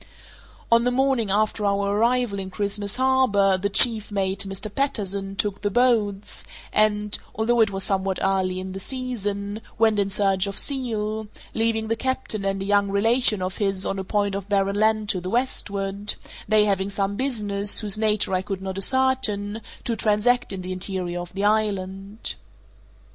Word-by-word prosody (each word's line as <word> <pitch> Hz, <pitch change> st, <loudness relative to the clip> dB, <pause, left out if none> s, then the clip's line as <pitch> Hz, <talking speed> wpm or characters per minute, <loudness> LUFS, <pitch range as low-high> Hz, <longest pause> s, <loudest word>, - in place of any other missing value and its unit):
On 230 Hz, 0 st, +6 dB
the 245 Hz, -, +2 dB
morning 255 Hz, -3 st, +1 dB
after 210 Hz, +1 st, +1 dB
our 200 Hz, 0 st, +1 dB
arrival 235 Hz, -2 st, +1 dB
in 190 Hz, -1 st, -5 dB
Christmas 200 Hz, +1 st, -1 dB
Harbour 255 Hz, -7 st, +3 dB
the 195 Hz, +2 st, -1 dB
chief 220 Hz, 0 st, +3 dB
mate, 195 Hz, 0 st, -1 dB
Mr. 195 Hz, +2 st, -4 dB
Patterson, 200 Hz, -8 st, -1 dB
took 200 Hz, -1 st, -1 dB
the 205 Hz, -, 0 dB
boats, 210 Hz, -4 st, +1 dB, 0.3 s
and 210 Hz, -1 st, +2 dB, 0.2 s
(although 235 Hz, +2 st, +1 dB
it 220 Hz, -, +4 dB
was 195 Hz, -1 st, -3 dB
somewhat 190 Hz, -1 st, 0 dB
early 190 Hz, -1 st, 0 dB
in 190 Hz, 0 st, -6 dB
the 190 Hz, -, -6 dB
season) 205 Hz, -4 st, -3 dB, 0.2 s
went 220 Hz, -2 st, +3 dB
in 200 Hz, -1 st, +1 dB
search 195 Hz, -1 st, +2 dB
of 200 Hz, -, -5 dB
seal, 220 Hz, -5 st, -1 dB, 0.3 s
leaving 225 Hz, -1 st, 0 dB
the 225 Hz, -, 0 dB
captain 260 Hz, -4 st, -2 dB
and 195 Hz, 0 st, -1 dB
a -, -, -5 dB
young 200 Hz, 0 st, +2 dB
relation 215 Hz, 0 st, +3 dB
of 185 Hz, 0 st, -4 dB
his 195 Hz, -2 st, 0 dB
on 195 Hz, -, -2 dB
a -, -, -3 dB
point 205 Hz, +1 st, 0 dB
of 200 Hz, 0 st, -5 dB
barren 200 Hz, -1 st, +1 dB
land 215 Hz, 0 st, +2 dB
to 185 Hz, -4 st, 0 dB
the 180 Hz, -, -5 dB
westward, 200 Hz, -4 st, -1 dB, 0.3 s
they 215 Hz, -1 st, +5 dB
having 195 Hz, -1 st, 0 dB
some 200 Hz, 0 st, -2 dB
business, 205 Hz, -6 st, +1 dB
whose 205 Hz, -2 st, +2 dB
nature 215 Hz, -2 st, +1 dB
I 185 Hz, -, +2 dB
could 195 Hz, 0 st, -5 dB
not 190 Hz, 0 st, -4 dB
ascertain, 225 Hz, -4 st, +1 dB, 0.2 s
to 235 Hz, -, -1 dB
transact 225 Hz, +3 st, +2 dB
in 190 Hz, -2 st, -5 dB
the 185 Hz, -, -5 dB
interior 185 Hz, -1 st, -2 dB
of 175 Hz, -, -9 dB
the 195 Hz, -, -2 dB
island. 200 Hz, -1 st, -1 dB
205 Hz, 175 wpm, -24 LUFS, 195-220 Hz, 0.3 s, On